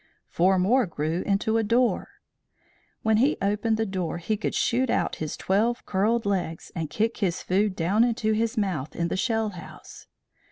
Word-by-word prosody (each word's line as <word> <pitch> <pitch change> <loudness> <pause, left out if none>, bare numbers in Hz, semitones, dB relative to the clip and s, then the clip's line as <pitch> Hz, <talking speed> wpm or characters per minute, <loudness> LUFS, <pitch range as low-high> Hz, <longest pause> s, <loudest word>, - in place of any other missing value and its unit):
Four 185 +2 +3
more 220 +6 +3
grew 160 +2 -2
into 215 +2 +1
a 225 - +2
door. 235 +3 +1 1.0
When 220 -1 +3
he 270 +7 +3
opened 210 +2 0
the 225 - 0
door 185 -5 -3
he 170 +6 -1
could 210 - -3
shoot 255 +2 +1
out - - 0
his 155 -1 -4
twelve 225 +6 0
curled 215 +4 +1
legs 180 -5 -2
and 160 -3 -3
kick 225 +7 -1
his 180 -4 -1
food 195 +1 +1
down 190 +7 +2
into 230 -2 +1
his 225 +2 0
mouth 180 -9 -2
in 170 0 -1
the - - -1
shell 225 +3 0
house. 180 -4 -12
205 Hz, 175 wpm, -26 LUFS, 180-225 Hz, 1.0 s, Four